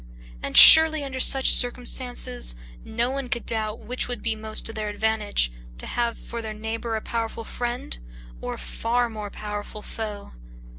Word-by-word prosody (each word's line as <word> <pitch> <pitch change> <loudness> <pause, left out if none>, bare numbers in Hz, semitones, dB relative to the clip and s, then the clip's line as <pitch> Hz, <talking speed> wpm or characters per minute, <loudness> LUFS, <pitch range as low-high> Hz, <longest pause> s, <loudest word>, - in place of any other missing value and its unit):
And - - -4
surely 320 -2 +10
under 265 -2 -6
such 265 +1 +4
circumstances, 245 - 0 0.3
no 235 +3 -2
one 270 -2 -6
could 240 -1 -3
doubt 220 -1 -4
which 250 +1 -2
would 245 -1 -7
be 225 -1 -1
most 215 0 0
to 225 - -2
their 215 -1 -5
advantage, 210 - -1 0.3
to - - -4
have 235 -1 -3
for 235 0 -8
their 215 -1 -7
neighbor 225 +1 -5
a 220 - -4
powerful 230 0 -5
friend 240 - -5 0.4
or - - -5
a - - -13
far 230 - -3
more 210 -2 -7
powerful 210 0 -8
foe. 210 -2 -7
225 Hz, 165 wpm, -23 LUFS, 215-245 Hz, 0.4 s, surely